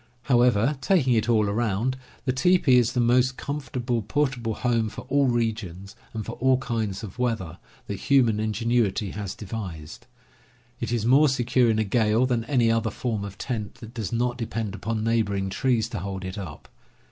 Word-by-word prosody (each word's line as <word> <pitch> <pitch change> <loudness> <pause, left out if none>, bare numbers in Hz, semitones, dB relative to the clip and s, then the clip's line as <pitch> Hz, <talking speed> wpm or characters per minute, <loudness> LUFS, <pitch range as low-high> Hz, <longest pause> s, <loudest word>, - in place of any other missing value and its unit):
How 120 -3 +3
ever, 125 +4 +3
taking 135 -6 +3
it 110 0 +1
all 110 -3 +3
around, 110 +3 0 0.3
the 130 - +1
teepee 135 -1 +4
is 120 -1 +1
the - - 0
most 125 +2 +3
com 145 +1 -4
fortable 120 -4 -3
portable 125 -4 0
home 115 -3 0
for - - -8
all 140 0 +3
regions, 110 -5 -2 0.2
and 110 -2 -5
for - - -5
all 130 0 +3
kinds 115 -7 -3
of 105 +3 -8
weather, 115 -9 -2 0.3
that 100 - -4
human 120 -6 +3
ingenuity 110 -2 0
has 100 -2 -5
devised. 90 -8 -7 0.7
It - - -3
is 115 -3 0
more 140 +5 +5
secure 125 -1 +2
in 110 - +2
a 110 - +2
gale 110 +3 +2
than 120 -3 0
any 120 -3 +2
other 115 0 +1
form 110 -1 -3
of 100 0 -7
tent 110 -6 -4
that 115 0 -11
does 110 -3 -4
not 120 +1 -1
depend 110 -3 -3
upon 110 +2 -3
neighboring 100 -4 0
trees 115 +2 +1
to - - -4
hold 95 0 -5
it 95 +2 -5
up. 80 -7 -8
115 Hz, 185 wpm, -25 LUFS, 105-125 Hz, 0.7 s, more